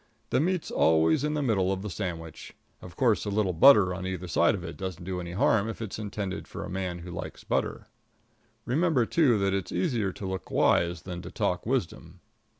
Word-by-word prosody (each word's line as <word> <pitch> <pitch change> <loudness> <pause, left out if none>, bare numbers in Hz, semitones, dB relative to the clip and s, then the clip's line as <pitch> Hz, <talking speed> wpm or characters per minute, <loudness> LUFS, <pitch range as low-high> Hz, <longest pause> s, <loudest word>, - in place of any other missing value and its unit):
The - - +3
meat's 180 +3 -1
always 80 - +3
in 150 0 0
the 150 - 0
middle 95 -7 +1
of 95 0 -3
the 105 - -4
sandwich. 85 -4 -6 0.3
Of 90 - -11
course, 120 -5 +2
a 105 - -3
little 100 -2 0
butter 95 -1 +7
on 95 0 -5
either 90 -1 -4
side 85 +2 +3
of 90 - -7
it 80 - -6
doesn't 95 -2 -6
do 90 0 -4
any 85 0 -7
harm 110 +2 +2
if 115 - -6
it's 110 -2 -5
intended 100 -2 -4
for - - -7
a - - -8
man 95 -2 -3
who 90 +1 -9
likes 85 -1 -7
butter. - - -2 0.8
Remember, 140 -1 +2
too, 130 -4 +3
that 100 -1 +1
it's 95 -2 -2
easier 120 - 0
to 95 - -8
look 95 -1 -5
wise 85 -1 +2
than 90 -2 -6
to 90 - -8
talk 90 +1 -2
wisdom. 90 -8 -3
95 Hz, 210 wpm, -28 LUFS, 90-110 Hz, 0.8 s, butter